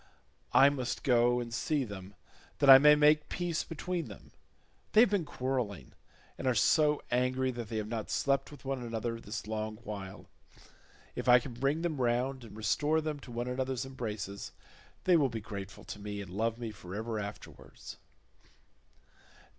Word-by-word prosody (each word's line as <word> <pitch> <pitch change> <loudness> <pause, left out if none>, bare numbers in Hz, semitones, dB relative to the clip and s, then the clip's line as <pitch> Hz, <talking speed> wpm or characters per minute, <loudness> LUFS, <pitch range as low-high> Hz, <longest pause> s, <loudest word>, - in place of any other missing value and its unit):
I 135 +1 +7
must 130 -3 -3
go 120 -1 +3
and 120 -1 -5
see 140 +5 0
them 100 -3 -9 0.4
that 140 -1 +7
I 135 - +12
may 150 +1 +7
make 150 0 +4
peace 175 -2 -2
between 170 -1 -4
them; 100 - -12 0.6
they 215 - +8
have 235 - +5
been 195 -6 +1
quarrelling, 125 - -3 0.5
and 130 - -2
are 130 - +3
so 150 +6 +3
angry 130 +1 +1
that 120 -3 -6
they 110 - -3
have 105 -1 -2
not 110 -1 -4
slept 140 0 +1
with 145 -2 -14
one 135 -1 -2
another 115 0 -3
this 105 +1 -6
long 110 0 -3
while; 100 -3 -7 0.9
if - - -2
I 125 - +9
can 125 0 -4
bring 135 +7 0
them 155 -6 -1
round 125 +2 0
and 110 -2 -11
restore 150 +8 +1
them 155 -2 -3
to 130 - -12
one 120 +1 -3
another's 130 0 -2
embraces, 105 -6 -5 0.5
they 180 - +5
will 145 -5 +4
be 115 - -4
grateful 100 -1 -8
to 105 - -8
me 105 0 -5
and 95 -3 -7
love 115 +4 -1
me 115 -2 -5
for 95 -2 -9
ever 110 0 -3
afterwards." 100 0 -9
125 Hz, 175 wpm, -31 LUFS, 110-140 Hz, 0.9 s, I